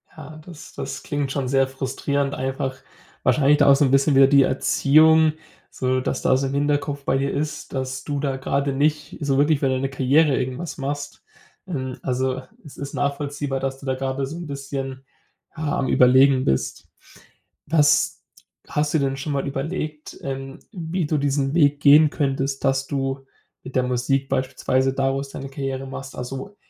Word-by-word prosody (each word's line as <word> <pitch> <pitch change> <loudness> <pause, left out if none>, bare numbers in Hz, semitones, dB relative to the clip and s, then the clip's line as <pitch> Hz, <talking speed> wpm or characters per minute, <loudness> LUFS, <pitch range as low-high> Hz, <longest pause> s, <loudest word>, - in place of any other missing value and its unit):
Ja, 155 -1 -10
das 170 -4 -12
das - - -6
klingt 145 -2 -2
schon 135 -2 -2
sehr 135 0 +2
frustrierend, 135 +1 -2
einfach 130 0 -3 0.5
wahrscheinlich 150 0 +4
da - - +5
auch - - +7
so 140 - +3
'n 130 - +1
bisschen 135 +1 +3
wieder 135 0 +7
die 140 0 +6
Erziehung 155 +4 +4 0.4
so, 130 0 -1
dass 130 - -2
da - - +3
so 135 +1 -1
im 135 - -4
Hinterkopf 145 0 -1
bei 135 - +1
dir 135 +1 0
ist, 150 +1 -4
dass 130 0 -3
du 145 0 -3
da 135 -2 -1
gerade 140 +1 -1
nicht 150 +2 0
so 140 -2 +1
wirklich 145 +1 +3
für 135 - +1
deine 130 +1 -1
Karriere 135 +2 +3
irgendwas 130 +7 -4
machst. 145 +1 -5 0.4
Ähm, 130 -7 -4
also 130 0 -1 0.2
es 150 - -12
ist 140 0 -6
nachvollziehbar, 145 -1 -2
dass 135 0 -3
du 140 - -12
da 130 -1 0
gerade 135 +1 -2
so 150 +5 -7
'n 175 -2 -7
bisschen, 135 -1 -5 0.5
ja, 155 -2 -2
am 130 - 0
Überlegen 130 +1 +5
bist. 65 - -1 0.8
Was 150 -2 +3 0.5
hast 150 0 -1
du 160 - +3
denn 135 -1 -1
schon 145 +2 -3
mal 140 0 -1
überlegt, 150 +2 -5
ähm, 135 0 -5
wie 175 -3 -3
du 150 +1 0
diesen 140 -1 0
Weg 145 -3 +3
gehen 150 +2 +7
könntest, 135 -2 -2
dass 135 -1 +1
du 135 -1 -3 0.4
mit 130 - -10
der 130 - +3
Musik 130 +2 0
beispielsweise 130 0 0
daraus 135 +1 -1
deine 135 0 -7
Karriere 135 -1 -4
machst? 135 0 -8
Also, 135 +11 -6
135 Hz, 180 wpm, -23 LUFS, 135-145 Hz, 0.8 s, auch